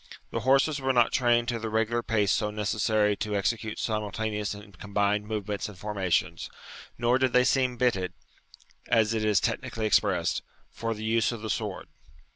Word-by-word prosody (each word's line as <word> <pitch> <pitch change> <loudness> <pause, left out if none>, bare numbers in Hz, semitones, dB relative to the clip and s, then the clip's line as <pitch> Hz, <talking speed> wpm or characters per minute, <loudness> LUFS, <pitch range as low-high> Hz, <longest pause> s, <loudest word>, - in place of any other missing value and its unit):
The - - -1
horses 135 +4 +3
were 135 0 +1
not 120 -2 +4
trained 120 -2 +3
to 120 -1 -1
the 115 0 -4
regular 115 +2 +1
pace 105 -4 +1
so 105 -1 +1
necessary 105 0 +1
to 105 -1 -2
execute 110 +1 -1
simultaneous 105 -1 -2
and 105 -1 -13
combined 105 0 0
movements 105 -1 -3
and 100 - -12
formations; 95 -3 -1 0.5
nor 120 +2 +2
did 130 -2 +1
they 125 - +5
seem 130 -1 +1
bitted 105 -7 +1 0.8
(as 110 -1 +3
it 110 -1 -1
is 105 -2 +3
technically 115 -1 -2
expressed) 105 - +2 0.3
for 115 -1 -3
the 110 +1 -6
use 115 +1 +2
of 115 -2 -7
the 110 - -2
sword. - - -3
110 Hz, 170 wpm, -27 LUFS, 105-120 Hz, 0.8 s, they